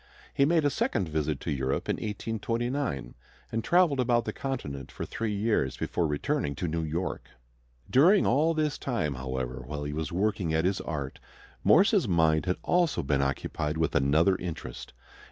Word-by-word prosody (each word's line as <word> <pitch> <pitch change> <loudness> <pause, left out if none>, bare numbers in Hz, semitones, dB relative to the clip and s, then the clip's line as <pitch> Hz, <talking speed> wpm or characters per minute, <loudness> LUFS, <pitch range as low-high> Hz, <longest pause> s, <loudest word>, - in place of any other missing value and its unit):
He 140 - +3
made 160 0 +3
a 145 - +3
second 95 -9 0
visit 75 -1 -1
to 80 - -3
Europe 65 -1 -1
in - - 0
1829, 115 - -3 0.4
and 115 0 -1
traveled 175 -6 +3
about 120 -2 +2
the - - -3
Continent 75 - -5
for - - -5
three 110 -1 -3
years 100 - 0
before 85 - -1
returning 70 -1 -1
to 90 - -3
New 80 +1 -1
York. 80 +4 -3 0.6
During 175 +10 +5
all 155 +6 +3
this 155 -2 0
time, 115 - -1
however, 65 -1 -4
while 75 +3 -5
he 75 0 -4
was 80 -1 -3
working 90 -3 0
at 80 +2 +1
his 95 +1 +1
art, 70 -4 -5 0.4
Morse's 195 - +5
mind 80 -2 +2
had 90 - +1
also 175 -3 +2
been 70 0 +1
occupied 75 +3 -2
with 80 -1 0
another 75 +7 +3
interest. 85 -3 -6
90 Hz, 170 wpm, -28 LUFS, 75-125 Hz, 0.6 s, During